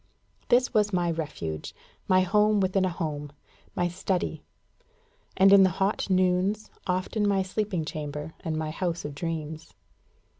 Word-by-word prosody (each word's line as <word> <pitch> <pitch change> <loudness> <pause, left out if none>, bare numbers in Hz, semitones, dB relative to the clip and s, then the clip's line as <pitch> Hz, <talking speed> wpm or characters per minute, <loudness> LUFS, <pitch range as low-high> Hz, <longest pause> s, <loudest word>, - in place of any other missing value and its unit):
This 250 +2 +3
was 210 -2 +3
my 175 -2 +1
refuge, 115 - -5 0.3
my 185 0 +5
home 210 +3 +3
within 190 0 +2
a - - +1
home, 150 -4 -4 0.4
my 175 - +1
study 180 +1 -2 1.0
and, 195 +1 +7
in 200 - +9
the 190 - +6
hot 195 +1 0
noons, 185 +3 +1 0.2
often 185 +3 0
my 195 -1 +2
sleeping 190 -3 -2
chamber, 150 0 -5
and 160 -1 -3
my 155 -1 -2
house 170 0 -3
of 145 - -5
dreams. 160 0 -5
180 Hz, 145 wpm, -27 LUFS, 160-195 Hz, 1.0 s, in